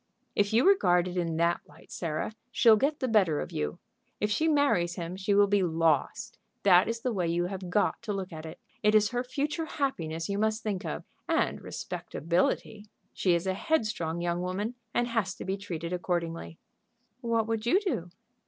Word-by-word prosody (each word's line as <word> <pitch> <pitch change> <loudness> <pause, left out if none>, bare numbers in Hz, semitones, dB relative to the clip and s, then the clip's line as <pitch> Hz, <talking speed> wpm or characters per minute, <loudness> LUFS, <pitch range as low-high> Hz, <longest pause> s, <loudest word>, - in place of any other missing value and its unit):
"If 205 0 +2
you 235 +9 +4
regard 180 - +4
it 180 - -5
in 165 -3 -1
that 170 +1 +2
light, 150 +3 -18
Sarah, 165 +4 -3 0.2
she'll 235 -3 +6
get 285 +7 0
the 260 - +1
better 190 -10 +3
of - - -5
you. 75 0 -3 0.4
If 210 - 0
she 310 +10 +2
marries 285 - +2
him 170 0 -5
she 195 +1 0
will 205 0 +6
be 200 0 +2
lost; 165 -4 0 0.2
that 185 -2 +6
is 230 0 -2
the 250 -1 -1
way 180 -4 0
you 170 +1 +1
have 185 -1 -5
got 205 +4 +1
to 230 -3 -4
look 190 -3 -4
at 155 -1 -7
it. 160 0 -9 0.2
It 210 0 +4
is 210 -1 +5
her 245 0 -1
future 295 +5 -2
happiness 165 - -2
you 200 0 -2
must 220 +1 0
think 200 -4 -2
of 75 - -4 0.3
and - - +1
respectability. 185 +6 -2 0.3
She 180 -3 +2
is 170 +2 -1
a 190 - +1
headstrong 195 - -1
young 175 0 -1
woman, 195 +6 -2 0.2
and 240 +1 +1
has 225 -6 -1
to - - -8
be 190 - -1
treated 175 -4 -5
accordingly." 170 -2 -3 0.6
"What 230 -3 +1
would 225 0 -2
you 370 - +5
do?" 345 - -2
195 Hz, 195 wpm, -29 LUFS, 170-225 Hz, 0.6 s, she'll